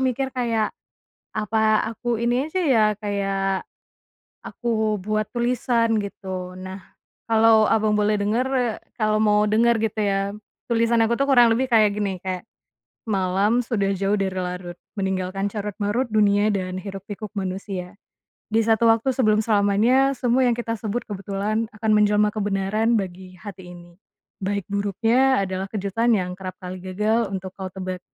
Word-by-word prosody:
mikir 265 0 -1
kayak, 230 -4 0 0.6
apa 215 0 +2
aku 240 +1 -2
ini 240 +5 0
aja 370 +4 -2
ya 245 -8 +4
kayak, 195 -2 -2 0.8
aku 220 -3 -1
buat 215 +2 -2
tulisan 235 -2 +1
gitu, 185 -2 -6
nah, 185 +1 -7 0.5
kalau 225 -1 +5
Abang 215 -1 +2
boleh 210 0 +2
denger 215 +6 0 0.5
kalau 215 -2 +1
mau 210 0 +4
denger 235 +3 +3
gitu 220 0 -2
ya 195 -1 +1 0.5
tulisan 230 0 +2
aku 235 +1 +1
tuh 275 - +2
kurang 245 -4 +6
lebih 255 +3 +1
kayak 215 -2 +5
gini, 200 -2 -1
kayak, 185 +3 -4 0.6
"Malam 200 +2 +1
sudah 200 -4 0
jauh 200 +1 +1
dari 195 -1 0
larut 180 -1 -5 0.2
meninggalkan 190 0 -2
carut-marut 210 +3 -2
dunia 210 -1 +3
dan 185 -1 -3
hiruk-pikuk 200 +2 -7
manusia, 190 -1 -4 0.5
di 225 +1 +2
satu 225 +1 +3
waktu 225 +4 +2
sebelum 215 -4 +3
selamanya 225 +6 +3
semua 250 +1 +2
yang 235 - +2
kita 230 -1 -3
sebut 225 +2 -2
kebetulan 205 +2 -2
akan 220 0 -1
menjelma 210 0 +3
kebenaran 205 +2 0
bagi 185 -1 -6
hati 185 -2 -10
ini, 175 +1 -16 0.4
baik 200 0 -2
buruknya 225 +5 +2
adalah 190 +1 -3
kejutan 210 +3 -1
yang 180 -1 -2
kerap 185 -1 -6
kali 185 0 -7
gagal 210 +4 0
untuk 190 -1 -5
kau 190 -1 -6
tebak,", 185 -1 -5
210 Hz, 145 wpm, -23 LUFS, 195-225 Hz, 0.8 s, kurang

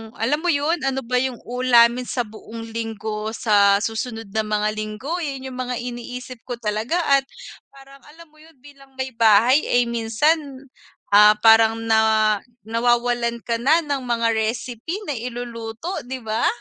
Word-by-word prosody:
alam 275 +7 0
mo 350 - -4
'yun 320 +1 +1
ano 270 -1 -2
ba 250 +1 0
'yung 260 -1 -1
uulamin 245 0 +3
sa 245 - -1
buong 225 +1 -10
linggo, 220 -1 -4
sa 200 -2 +3
susunod 225 -1 -4
na 220 0 -1
mga 210 0 0
linggo 215 +11 -4
'yun 270 -5 -5
'yung 255 - -9
mga 250 0 -3
iniisip 245 +1 -7
ko 245 - -3
talaga. 220 +6 -2 0.2
At 275 -1 +4 0.4
parang 275 0 -17
alam 320 +1 -16
mo 310 - -23
'yun 320 0 -19
bilang 275 -2 -17
maybahay 235 0 +4
ay 245 -4 +1
minsan, 235 +8 +1 0.7
ah, 210 +1 +7
parang 225 0 +5
na 220 -1 +3 0.2
nawawalan 235 +1 0
ka 230 -1 -2
na 310 +7 +3
ng 285 -2 -2
mga 230 -1 +1
recipe 235 - -3
na 345 - -4
iluluto, 235 +4 -6 0.2
'di 260 -2 -6
ba? 220 +1 0
235 Hz, 155 wpm, -21 LUFS, 220-265 Hz, 0.7 s, ah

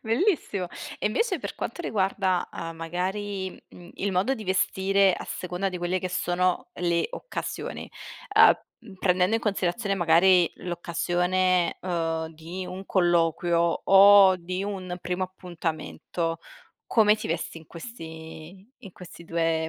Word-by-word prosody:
bellissimo. 225 - 0 0.3
E - - -1
invece 455 - 0
per - - -6
quanto - - -5
riguarda, 190 - 0
uhm, 165 0 -6
magari, 190 +4 -3 0.2
mhmm, 175 0 -14
il 200 0 -2
modo 195 +9 +1
di 215 - -8
vestire 190 +1 +2
a - - -7
seconda 180 +2 -3
di 180 -1 -5
quelle 175 +2 -1
che 185 - -3
sono 180 0 0
le 170 -1 0
occasioni. - - -6 0.5
Uhm, 230 -5 +3
prendendo 185 +3 +2
in 225 - -3
considerazione 200 0 -1
magari 175 0 +4
l'occasione, 180 +1 0
uhm, 165 -3 -2
di 170 +4 -7
un 190 +1 -7
colloquio 170 -1 +2
o 195 -1 +8
di 185 +2 -4
un 185 -3 -4
primo 180 +1 -3
appuntamento, 170 -2 -4 0.5
come 215 -2 +4
ti 215 - -6
vesti 165 0 -3
in 160 - -17
questi 165 0 -10
in 195 - -12
questi 175 -2 -12
2 165 -1 0
180 Hz, 135 wpm, -26 LUFS, 170-195 Hz, 0.5 s, o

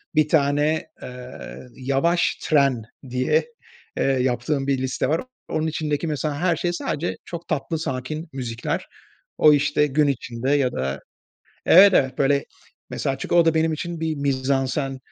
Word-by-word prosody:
Bir 155 -1 +4
tane, 150 +1 +2
eee, 125 0 -9 0.4
yavaş 140 +7 +1
tren 140 -7 +2 0.3
diye, 125 +1 +1 0.5
eee, - - +1
yaptığım 130 +1 0
bir 140 -1 +2
liste 130 +2 -1
var. 160 - +1 0.3
Onun 155 +1 -1
içindeki, 155 0 -2
mesela, 150 -1 -2
her 175 -1 +2
şey 175 +2 -1
sadece 165 -1 -2
çok 170 -1 -7
tatlı 155 +3 -2
sakin 155 +3 -4
müzikler. 120 -3 -3 0.5
O 150 - +7
işte 145 +1 +2
gün 150 +2 +2
içinde 125 -1 -2
ya 140 -3 +2
da, 65 +2 -3 0.7
evet, 195 +3 +8
evet, 130 -5 +2
böyle, 140 0 +2 0.5
mesela, 135 -1 -2
çünkü - - -3
o 170 - +6
da 165 0 +3
benim 160 0 +2
için 170 +1 -5
bir 160 -1 -1
mizansen, 135 0 -1
140 Hz, 150 wpm, -23 LUFS, 130-160 Hz, 0.7 s, evet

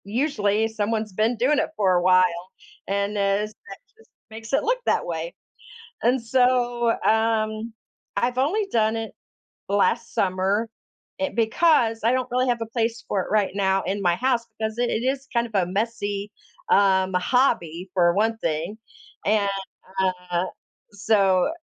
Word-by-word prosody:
Usually 220 -2 0
someone's 220 -1 -2
been 220 +5 +1
doing 270 +6 +2
it - - 0
for 190 -3 +3
a 175 - +3
while, 185 0 +3 0.4
and 200 +1 0
is 200 +2 0 0.2
that 195 - -8 0.2
just 450 - -22 0.2
makes 225 0 -9
it 275 - +3
look - - +1
that - - +2
way, 165 0 -4 0.7
and, 250 +2 +2
so, 245 -1 +2
um, 220 0 +1 0.4
I've 245 +1 0
only 380 +11 +1
done 220 -1 +2
it 225 -1 -5 0.6
last 225 +3 +1
summer 195 +4 0 0.5
it 285 -3 -3
because 230 0 +3
I 230 - +4
don't 255 -1 0
really 255 +1 +1
have 240 -1 0
a - - -3
place 230 0 -2
for 200 - 0
it - - -8
right 210 -2 +2
now 195 -1 +1
in 200 +1 -2
my 175 -2 +3
house 245 +2 0
because 220 +1 -3
it 245 0 +1
is 270 +1 -2
kind 235 -1 +1
of 225 - -16
a 190 -3 +2
messy, 205 -1 -2 0.4
um, 190 -1 +4
hobby 180 - +1
for 175 -2 +3
one 220 +3 +1
thing, 165 +4 -3 0.5
and, 205 -1 +2 0.8
uh, 175 +1 +1 0.5
so, 200 - +2
220 Hz, 155 wpm, -24 LUFS, 195-235 Hz, 0.8 s, I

